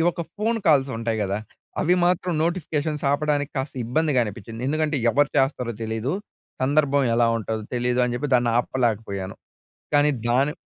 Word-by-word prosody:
ఒక్క 170 - -4
ఫోను 225 +2 0
కాల్సుంటాయి 130 -7 +2
గదా! 100 0 -1 0.4
అవి 175 - +4
మాత్రం 180 0 +1
నోటిఫికేషన్స్ 155 -3 -2
ఆపడానికి 145 0 0
కాస్త 135 +2 -4
ఇబ్బందిగా 145 +2 +1
అనిపిచ్చింది. 115 +2 -7
ఎందుకంటే, 155 0 0
ఎవరు 145 0 +3
చేస్తారో 125 -3 0
తెలీదు, 110 +4 -2 0.5
సందర్భం 140 0 +3
ఎలా 115 0 +4
ఉంటదో 110 0 -4
తెలీదు 125 +1 +1
అని 120 - -2
జెప్పి, 145 +3 -3
దాన్ని 120 -1 +1
ఆపలేకపోయాను, 110 -7 -1 0.6
కానీ 145 0 +4 0.2
దాని 135 +5 +2
135 Hz, 140 wpm, -24 LUFS, 115-150 Hz, 0.6 s, అవి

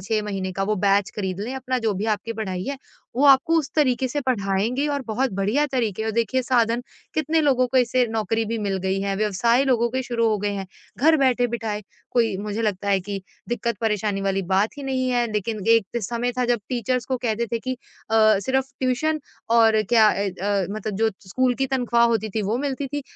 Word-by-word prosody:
6 215 +3 -1
महीने 195 -2 -3
का, 195 +1 -2
वो 210 +1 0
बैच 200 0 +2
ख़रीद 190 -2 -3
लें 245 +5 -4
अपना 255 -1 -2
जो 220 -3 0
भी 195 +3 -3
आपकी 230 +3 -6
पढ़ाई 190 -4 -4
है। 280 0 -3 0.4
वो 280 - +3
आपको 275 +4 +5
उस 300 -2 -3
तरीक़े 260 -3 +2
से 290 +3 -2
पढ़ाएँगे 220 +4 0
और 285 -1 -1
बहुत 235 +1 -1
बढिया 210 +10 +1
तरीक़े 220 -5 -1
और 220 - 0
देखिए 235 +3 +1
साधन 240 -1 +1 0.3
कितने 310 +1 +1
लोगों 260 -4 +3
को 265 - -1
इससे 250 0 +2
नौकरी 225 0 0
भी 230 +1 -2
मिल 200 -2 -1
गई 190 +1 0
है, 195 0 -1
व्यवसाय 215 +5 +2
लोगों 235 -3 +2
के 260 +1 -1
शुरू 235 -2 0
हो 215 -1 +1
गए 205 +1 -1
हैं 195 -1 -4 0.3
घर 315 +4 +5
बैठे-बिठाए, 235 -5 0 0.3
कोई 225 -5 +1
मुझे 210 +3 -3
लगता 200 -2 -1
है 195 - +3
कि 195 +1 -5 0.3
दिक़्कत 235 -2 -1
परेशानी 210 -2 0
वाली 195 0 0
बात 210 +8 +1
ही 285 - -6
नहीं 260 -1 -1
है 240 -1 +2
लेकिन 215 +1 -2
एक 230 0 +3
समय 240 +4 -2
था 250 - +2
जब 240 -3 +1
टीचर्स 250 0 -1
को 260 - -1
कहते 235 -1 -1
थे 230 - +1
कि 255 +3 -3 0.4
अ, 215 -2 +5
सिर्फ़ 265 +5 -1
ट्यूशन 290 +5 0 0.4
और 220 -1 +5
क्या 225 -3 +6
अ 200 -1 0
अ, 200 -2 +1
मतलब 215 0 -4
जो 220 +1 +2 0.2
स्कूल 250 +5 +1
की 270 - -1
तनख़्वाह 245 -3 +2
होती 220 -2 0
थी 220 - 0
वो 210 +4 0
मिलती 275 0 -2
थी 290 0 -2
230 Hz, 215 wpm, -23 LUFS, 205-255 Hz, 0.4 s, क्या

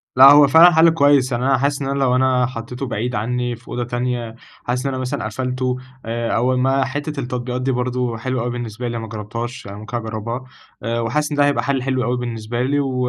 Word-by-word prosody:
لأ 130 +1 +9
هو 145 0 +7
فعلًا 165 +5 +8
حل 165 0 +6
كويس، 145 -4 +3
يعني 120 0 -1
أنا 135 0 +3
حاسس 140 +2 0
إن 135 - -2
أنا 140 0 -1
لو 130 -2 +2
أنا 130 -1 +3
حطيته 125 +2 -6
بعيد 120 +1 -3
عني 120 +3 -1
في 120 +1 -21
أوضة 120 - -3
تانية، 120 -1 -3 0.3
حاسس 125 +2 -2
إن 135 - -1
أنا - - -3
مثلًا 130 -3 -3
قفلته 125 +3 -2 0.3
آآ 115 +1 -2
أول 125 +2 +2
ما 135 +1 +2
حتة 145 +1 -4
التطبيقات 125 -1 -3
دي 135 +1 0
برضه 125 -1 -1
حلوة 130 +1 -2
أوي 120 - -2
بالنسبة 120 0 -5
لي، 120 0 -3
أنا 115 - -5
ما 110 - -7
جربتهاش 115 +3 -6
أنا 100 +1 -8
ممكن 110 +3 -5
أجربها، 115 +2 -4 0.4
آآ 115 +1 -1
وحاسس 150 +7 -1
إن 145 - -2
ده 145 - +5
هيبقى 145 0 +1
حل 135 -2 0
حلو 130 -1 0
أوي 125 0 0
بالنسبة 120 -1 -4
لي، 145 +3 +1
و 135 -2 -1
125 Hz, 235 wpm, -20 LUFS, 120-135 Hz, 0.4 s, لأ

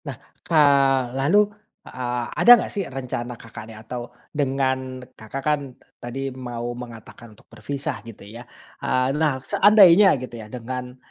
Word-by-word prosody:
Nah, - - -6 0.2
ka 165 - -1 0.6
lalu, 150 +11 +3 0.4
a 125 -1 -4
ada 240 - +5
nggak - - -4
sih 200 - -1
rencana 125 -2 -5
Kakaknya, 110 -1 -11
atau 120 +1 -6 0.2
dengan 130 -2 -2
Kakak 120 +5 -8
kan 150 -1 +2 0.4
tadi 135 +2 -5
mau 120 -2 -5
mengatakan 120 -1 -11
untuk - - -21
berpisah 140 +5 -5
gitu 115 -3 -12
ya, 110 +4 -10 0.4
eee, 130 +1 0
nah 150 -4 +1
seandainya 195 0 +6
gitu 120 -2 -8
ya 105 - -11
dengan, 125 +1 -7
130 Hz, 140 wpm, -23 LUFS, 120-135 Hz, 0.6 s, seandainya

